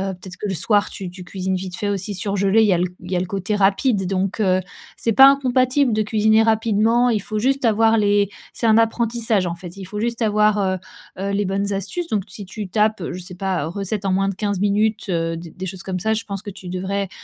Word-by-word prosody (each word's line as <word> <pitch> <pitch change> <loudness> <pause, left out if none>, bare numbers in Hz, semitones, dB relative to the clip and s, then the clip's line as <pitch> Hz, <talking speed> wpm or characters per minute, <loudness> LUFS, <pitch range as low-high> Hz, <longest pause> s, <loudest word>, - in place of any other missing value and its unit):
peut-être 180 0 -11
que 210 - -5
le - - -1
soir 205 +3 +1
tu 190 -2 -7
tu 180 +1 -10
cuisines 190 +1 -3
vite 185 -1 -5
fait 210 -2 -2
aussi 200 0 -2
surgelé, 200 +2 +1
il 220 - +4
y 195 - +4
a - - +3
l 175 +1 +1
il - - -11
y - - +1
a 175 - +1
le - - -2
côté 195 +2 -2
rapide. 200 +1 +2
Donc, 195 +3 -1
heu, 185 -2 +3 0.4
c'est 230 - 0
pas 270 +5 +9
incompatible 260 -1 +3
de 215 - +1
cuisiner 215 0 -1 0.2
rapidement, 225 +2 +2
il 215 -3 0
faut 215 +2 -5
juste 265 +4 +1
avoir 225 0 +4
les 205 -1 +2 0.2
c'est - - -4
un 220 -1 +5
apprentissage 225 -3 +1
en 170 - -2
fait. 175 +1 -11
Il 195 - -7
faut 210 +3 -6
juste 235 +1 -1
avoir, 210 0 +3
heu, 190 -2 0 0.4
heu, 195 +1 -2
les 200 +1 0
bonnes 200 +1 -1
astuces 200 - -3
donc 210 - -1
si 200 0 -9
tu 205 +2 -6
tapes, 215 0 +1
je 180 - -6
sais 180 0 -9
pas, 185 -4 -1
heu, - - -3
recettes 200 +3 -4
en 195 - +1
moins 195 +1 +1
de - - -2
15 205 -1 -2
minutes, 210 +2 +1
heu, 165 -2 -1
des 165 -1 -9
des 185 +3 -7
choses 185 -1 -7
comme 185 -1 -3
ça. 220 +5 +1
Je 220 - -3
pense 200 -2 -5
que 205 - -7
tu 190 -1 -10
devrais, 190 +2 -2
200 Hz, 255 wpm, -21 LUFS, 190-220 Hz, 0.4 s, pas